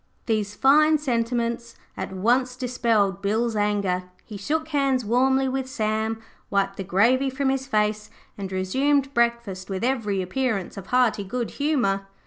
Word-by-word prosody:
These 210 -3 -1
fine 305 +3 +5
sentiments 235 -3 -2 0.2
at - - -5
once 245 +7 +1
dispelled 230 -6 0
Bill's 220 +3 0
anger. 200 -3 0 0.2
He 215 - -9
shook 315 +9 -2
hands 275 -5 +1
warmly 265 +4 +2
with 260 0 -2
Sam, 220 -2 -1 0.3
wiped 195 0 0
the 195 - -3
gravy 235 +9 +3
from 265 +1 -1
his 265 0 -1
face, 210 -3 0 0.3
and 195 -2 -6
resumed 270 +9 +1
breakfast 235 -6 0
with 190 +2 -3
every 220 -7 0
appearance 215 0 -2
of 195 -2 -9
hearty 250 -5 +2
good 235 +4 -3
humour. 235 -10 0
230 Hz, 145 wpm, -24 LUFS, 200-265 Hz, 0.3 s, fine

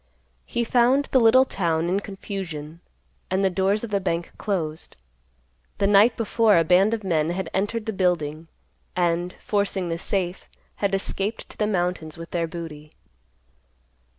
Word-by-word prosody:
He 235 - -1
found 250 +4 +3
the 260 - +5
little 250 +3 +6
town 170 -7 0
in 185 +3 +1
confusion 185 -6 -6 0.5
and 190 +1 +1
the 190 - +2
doors 195 +4 +1
of 230 - -5
the 200 - +2
bank 170 -2 -2
closed. 160 - -3 0.8
The 200 - +1
night 205 +4 +5
before 225 -2 +3
a 165 - +5
band 190 +6 +4
of 220 - -8
men 165 -4 +1
had 175 -1 -3
entered 210 +3 -1
the 220 - -2
building, 165 -4 0 0.5
and, 175 0 0
forcing 200 -3 0
the 165 0 -2
safe, 185 -1 -2 0.3
had 200 -1 +1
escaped 195 +2 -3
to - - -13
the 210 - +1
mountains 175 -5 -2
with 165 0 -9
their 170 -1 0
booty. 160 -3 -8
190 Hz, 155 wpm, -24 LUFS, 170-205 Hz, 0.8 s, little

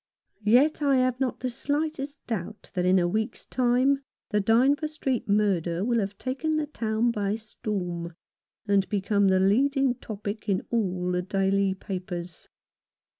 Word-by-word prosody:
Yet 270 +8 +4
I 280 -2 +3
have 255 -1 +1
not 265 -2 -1
the 255 - -1
slightest 290 +1 -3
doubt 215 -1 -5
that 180 -1 0
in 185 +1 +5
a 175 -1 +3
week's 220 +6 -2
time 255 +2 +2 0.3
the 210 -1 +2
Dynevor 260 +9 +3
Street 270 -7 -2
murder 190 -3 +1
will 235 -1 +2
have 200 -1 -3
taken 275 +5 -2
the 310 - 0
town 230 -4 0
by 205 -2 -1
storm, 180 -6 -4 0.5
and 200 -1 +2
become 200 0 +2
the 190 0 +4
leading 265 +7 +3
topic 210 -2 -6
in 190 -2 0
all 185 -6 0
the 180 0 0
daily 195 0 +1
papers. 180 -3 -6
215 Hz, 150 wpm, -27 LUFS, 190-255 Hz, 0.5 s, in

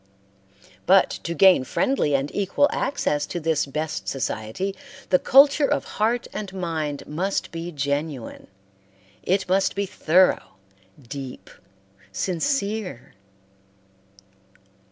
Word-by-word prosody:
But 190 +1 +5
to 170 - -3
gain 185 -4 +6
friendly 265 - +1
and 135 +1 -2
equal 200 +8 +2
access 150 - -1
to 175 - -4
this 160 -3 0
best 155 +3 -4
society, 130 - -3 0.3
the 180 - +4
culture 280 +2 +5
of - - 0 0.2
heart 235 +3 +1
and 205 -3 -5
mind 160 -5 -3
must 185 +6 -2
be 170 0 -5
genuine; 145 -3 -3 0.7
it 190 +1 0
must 190 +1 +1
be 200 0 -1
thorough, 180 - +2 0.4
deep, 135 0 -9 0.6
sincere. 195 - -2
175 Hz, 105 wpm, -24 LUFS, 145-195 Hz, 0.7 s, gain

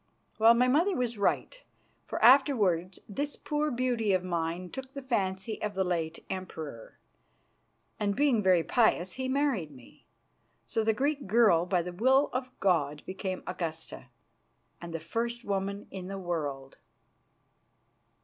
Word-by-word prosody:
Well, 225 +2 +7
my 250 +2 +3
mother 335 +9 +3
was 240 -4 -2
right, - - 0 0.5
for - - -3
afterwards 215 - +4
this 285 +8 -3
poor 300 0 -1
beauty 240 -5 0
of 185 -1 +1
mine 175 0 -3
took 265 0 -8
the 275 - -7
fancy 200 -4 -2
of 210 -1 -3
the 190 - +1
late 165 -3 -3
Emperor, 160 -10 -7 1.0
and, 200 -1 0
being 270 -5 +3
very 185 -4 +4
pious, 200 -6 +2
he 260 0 -3
married 260 - 0
me. 130 -5 -17 0.6
So 225 - -1
the 220 - +3
Greek 280 -1 -1
girl, 195 -6 +4
by 180 -2 +1
the 180 +1 -6
will 265 +9 +3
of 255 0 -2
God, 150 -6 +1
became 185 0 -4
Augusta 165 -6 -5 0.7
and 170 -1 -7
the 165 - -4
first 235 +8 -3
woman 200 0 -2
in 185 -2 -7
the 195 0 -5
world." 150 -7 -4
200 Hz, 145 wpm, -29 LUFS, 175-250 Hz, 1.0 s, Well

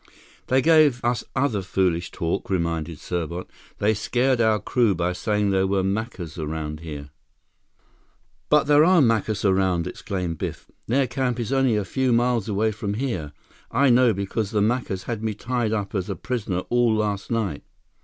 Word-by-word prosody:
"They 130 +1 +3
gave 155 -7 +4
us 120 -1 +1
other 120 -8 +1
foolish 90 -2 0
talk," 85 0 -3
reminded 85 -3 -1
Serbot. 85 +2 -4 0.3
"They 105 +1 +2
scared 125 +4 +1
our 110 -1 +3
crew 115 0 +1
by 90 +1 -1
saying 105 +2 0
there 95 0 +2
were 95 -1 +1
Macus 95 -5 -3
around 75 0 -4
here." 75 -3 -8 1.4
"But 150 -1 +5
there 145 +1 +5
are 180 +1 +5
Macus 110 -5 +1
around!" 95 -3 +2
exclaimed 90 -4 -4
Biff. - - -5 0.2
"Their 135 +4 +2
camp 125 -1 -2
is 120 +3 -2
only 135 -4 +3
a 105 -2 -1
few 130 +6 0
miles 120 -2 +1
away 110 +2 +1
from 105 -1 -4
here. 110 - -3 0.4
I 135 +2 +3
know, 125 0 +5
because 100 +1 -2
the 105 -1 0
Macus 105 -3 0
had 115 -3 -4
me 110 -2 -2
tied 120 0 -1
up 100 -3 -2
as 95 -1 -2
a 100 - -2
prisoner 100 -4 -3
all 120 -2 +3
last 105 -2 -2
night!" 110 -10 -1
105 Hz, 170 wpm, -24 LUFS, 95-120 Hz, 1.4 s, But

